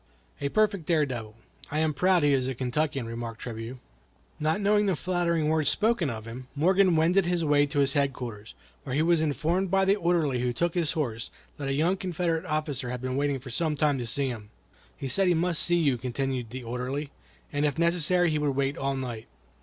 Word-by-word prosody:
"A 140 - 0
perfect 205 -3 +1
dare 160 -4 +3
devil. 115 -5 -6 0.3
I 150 - -3
am 155 -1 +1
proud 180 +3 +3
he 145 -1 +4
is 130 -2 +1
a 130 - -2
Kentuckian," 135 +1 -1
remarked 115 0 -6
Trabue. 115 +1 -6 0.6
Not 155 +5 +1
knowing 210 0 +3
the 190 - +2
flattering 170 -2 0
words 155 -2 +2
spoken 215 -7 +1
of 110 -2 -6
him, 125 +3 -8
Morgan 185 +4 +4
wended 170 +4 +3
his 175 -2 0
way 145 -1 +4
to 145 - -5
his 140 -1 +3
headquarters, 125 -6 -2 0.3
where 125 - -4
he 155 - +2
was 170 -1 +3
informed 165 +5 0
by 195 +1 +3
the 195 +1 +4
orderly 170 -8 +1
who 125 0 0
took 170 +7 0
his 170 -4 0
horse 115 -8 -3 0.3
that 140 - -4
a 135 - 0
young 165 +7 +2
Confederate 175 -2 -1
officer 145 -5 -2
had 125 0 -3
been 130 +1 -3
waiting 140 0 0
for 130 -1 -10
some 155 +4 0
time 145 -2 +1
to 120 - -4
see 135 +3 -1
him. 110 -4 -7 0.5
"He 135 - -4
said 185 +9 +3
he 175 - +4
must 170 0 +2
see 175 - +3
you," 140 -7 +2
continued 130 -1 -3
the 130 +2 -7
orderly, 125 +5 -4 0.4
"and 145 0 0
if 150 -1 0
necessary 170 +1 +3
he 155 - 0
would 145 -2 0
wait 140 +1 -1
all 135 0 -1
night." 120 -4 -5
145 Hz, 215 wpm, -27 LUFS, 130-170 Hz, 0.6 s, he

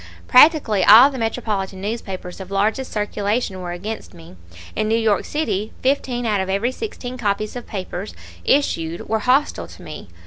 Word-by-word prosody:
Practically 255 - +5
all 235 +9 +9
the 265 - -6
metropolitan 215 -4 -2
newspapers 195 -3 -5
of 190 -1 -8
largest 215 +6 0
circulation 210 -1 -2
were 175 -1 -5
against 200 +3 -6
me; 165 - -14 0.4
in 215 - 0
New 225 +1 +2
York 220 -3 +1
City 215 -9 -2
fifteen 255 -2 0
out 210 -3 +1
of 190 - -4
every 200 +6 0
sixteen 255 - -6
copies 210 0 -1
of 245 - -7
papers 185 - -6 0.3
issued 170 - 0
were 220 - 0
hostile 260 +6 +1
to - - -14
me. - - -9
215 Hz, 165 wpm, -21 LUFS, 195-245 Hz, 0.4 s, all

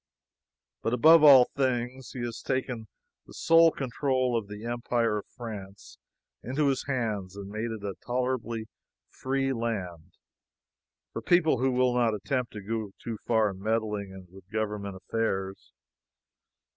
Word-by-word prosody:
But 115 - 0
above 160 +5 +7
all 135 -4 +9
things, 130 -2 -1
he 125 - -5
has 120 -1 -4
taken 125 -4 -2 0.4
the - - -13
sole 165 0 +6
control 130 -2 -1
of 110 -3 -1
the 105 +2 -8
empire 120 -2 0
of - - -11
France 105 -4 -9 0.4
into 140 +3 0
his 135 -1 -1
hands 110 -8 -2
and 100 0 -8
made 110 +2 -3
it 110 -2 -6
a 100 -1 -3
tolerably 120 -2 -2 0.4
free 135 0 -1
land 95 -8 -4 1.0
for 115 - -4
people 160 0 +3
who 130 +1 +2
will 125 0 +2
not 120 -3 +2
attempt 125 +4 -2
to 105 -2 -7
go 110 -1 -4
too 115 -3 -6
far 110 -3 +3
in 95 0 -11
meddling 105 -3 -2
with 95 0 -16
government 105 -2 -3
affairs. 95 -1 -3
115 Hz, 145 wpm, -28 LUFS, 105-130 Hz, 1.0 s, all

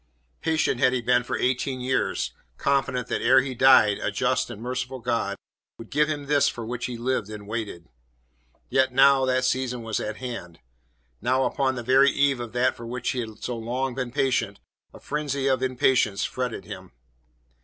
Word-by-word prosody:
Patient 160 -6 +1
had 130 0 +4
he 125 - 0
been 125 +1 +3
for 125 - -3
eighteen 130 +1 -1
years, 130 +1 -1 0.2
confident 135 -2 0
that - - -1
ere 130 +3 +5
he 130 0 -4
died, 125 -5 +5
a - - -1
just - - 0
and 105 - -8
merciful 125 +2 -4
God 115 -4 -1 0.4
would 115 - -12
give 150 +1 +2
him 145 -2 -3
this 145 0 +3
for 115 - -6
which 120 +1 -4
he 125 -2 -5
lived 120 -3 -1
and 105 -1 -8
waited. 105 -7 -5 0.8
Yet 130 -1 +2
now 135 +1 +5
that 130 0 +1
the 130 - +1
season 125 -2 -1
was 110 -1 -2
at 110 0 -4
hand; 115 -10 -7 0.6
now 130 +1 +2
upon 130 0 0
the 120 - -5
very 135 +3 +5
eve 140 -2 +2
of 120 -2 -6
that 125 +1 +2
for 115 - -9
which 125 +1 -2
he 130 - -3
had 110 -3 -7
so 125 - -3
long 125 +3 -2
been 130 -1 -3
patient, 125 -6 0 0.3
a - - -13
frenzy 140 -2 -3
of 130 -2 +2
impatience 130 -5 +2
fretted 125 -5 -4
him. 95 - -10
125 Hz, 190 wpm, -25 LUFS, 115-130 Hz, 0.8 s, ere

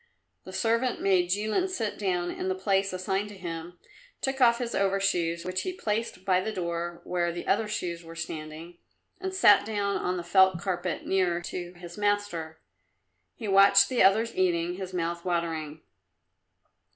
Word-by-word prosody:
The - - -8
servant 230 +2 0
made 185 -3 +2
Jilin 215 - 0
sit 225 - -3
down 180 -3 -1
in - - -4
the 185 - 0
place 195 +1 +1
assigned 190 +2 -2
to 205 - -11
him, 170 -1 -7 0.4
took 270 0 -2
off 235 -1 +6
his 240 -1 -3
overshoes, 190 -4 0
which 185 0 -2
he 370 - -3
placed 220 - -3
by 185 -1 +3
the 220 - -3
door 170 -2 -4
where 175 -1 -1
the 175 +1 -6
other 215 +2 +1
shoes 175 -5 -4
were 165 0 -11
standing, 160 +1 -7 0.4
and 380 0 -3
sat 290 - +6
down 205 -2 -1
on 180 0 -1
the 175 - -4
felt 190 0 +4
carpet, 180 -2 -3
nearer 180 -3 +1
to 175 0 -6
his 175 +2 -10
master. 205 -6 -1 0.8
He 220 - -6
watched 200 0 +6
the 255 - +1
others 220 +4 +4
eating, 175 -2 +1
his 185 0 -6
mouth 170 -1 -2
watering. 160 -3 -2
185 Hz, 165 wpm, -28 LUFS, 175-205 Hz, 0.8 s, off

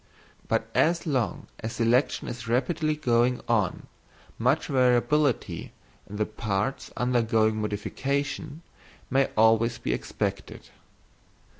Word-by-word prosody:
But - - 0
as 170 +2 +2
long 130 -8 -1
as 110 +1 -5
selection 120 +4 +1
is 120 -1 -6
rapidly 155 +6 +1
going 125 -3 +2
on, 110 -6 0 0.5
much 125 +7 +2
variability 130 +1 +1 0.4
in 105 - -7
the 105 +1 0
parts 110 +4 -2
undergoing 115 -3 +2
modification 140 +9 -3 0.5
may 135 +1 +3
always 115 +2 +4
be - - -2
expected. 60 - -4
120 Hz, 105 wpm, -27 LUFS, 110-140 Hz, 0.5 s, always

